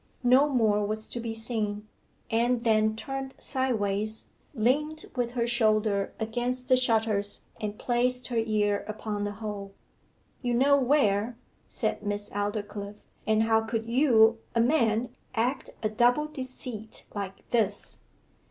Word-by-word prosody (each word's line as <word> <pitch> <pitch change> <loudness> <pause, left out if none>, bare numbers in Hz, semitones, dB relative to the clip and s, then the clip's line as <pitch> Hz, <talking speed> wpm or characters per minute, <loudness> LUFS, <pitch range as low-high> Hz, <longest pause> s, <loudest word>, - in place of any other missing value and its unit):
No 260 +4 +5
more 215 -6 +2
was 215 +1 -2
to 240 - -5
be 230 -1 -4
seen; 215 -2 -2 0.4
Anne 235 +1 +2
then 215 -1 +3
turned 270 +3 -5
sideways, 220 -5 0 0.3
leant 295 +7 +1
with 245 -2 -1
her 235 -2 0
shoulder 215 -4 +2
against 245 +3 -2
the 255 - +7
shutters 220 -5 +1 0.2
and 210 -1 -3
placed 250 +1 0
her 235 -2 +1
ear 210 -2 +1
upon 210 -1 -3
the 205 - -3
hole. 205 -2 -6 0.7
'You 245 -2 0
know 280 +3 +5
where,' 235 -4 +2 0.3
said - - -1
Miss 205 0 -3
Aldclyffe. 205 0 -3 0.3
'And 220 0 +3
how 225 0 +3
could 225 0 -2
you, 230 -3 +4 0.2
a - - +3
man, 235 -3 +2 0.3
act 245 +5 0
a 215 - +2
double 245 +7 +3
deceit 255 -6 -5
like 200 -2 -6
this? 215 -4 +1
225 Hz, 135 wpm, -28 LUFS, 210-250 Hz, 0.7 s, the